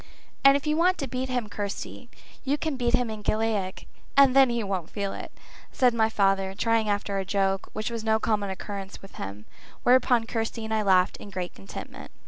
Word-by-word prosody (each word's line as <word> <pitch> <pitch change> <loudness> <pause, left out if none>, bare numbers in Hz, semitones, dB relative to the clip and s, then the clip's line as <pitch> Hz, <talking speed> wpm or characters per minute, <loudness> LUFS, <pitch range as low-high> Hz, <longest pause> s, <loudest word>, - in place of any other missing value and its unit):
"And 275 0 +8
if 285 - -8
you 305 0 +1
want 365 +2 +3
to 275 - -3
beat 255 +1 -3
him, 245 -3 -1
Kirsty, 205 +4 -6 0.3
you 275 +2 0
can 315 -1 -2
beat 245 -1 +2
him 245 -2 -1
in 215 -1 -6
Gaelic, 210 -3 -1 0.3
and 275 -2 +7
then 270 -2 +7
he 235 -1 -1
won't 190 -5 -3
feel 200 -2 -3
it," - - -7 0.4
said 250 -2 +3
my 220 -1 +2
father, 195 -2 +1
trying 225 -1 +1
after 205 -1 -1
a - - -1
joke, 195 0 0
which 215 +2 -3
was 230 -2 -4
no 220 0 +2
common 210 -3 0
occurrence 195 +1 -6
with 195 - -13
him, 100 +2 -7 0.4
whereupon 245 -2 +4
Kirsty 225 0 -3
and 220 - -3
I 220 - +2
laughed 185 -3 +3
in 205 - -10
great 185 -2 -5
contentment. 95 - -9
220 Hz, 205 wpm, -26 LUFS, 195-245 Hz, 0.4 s, And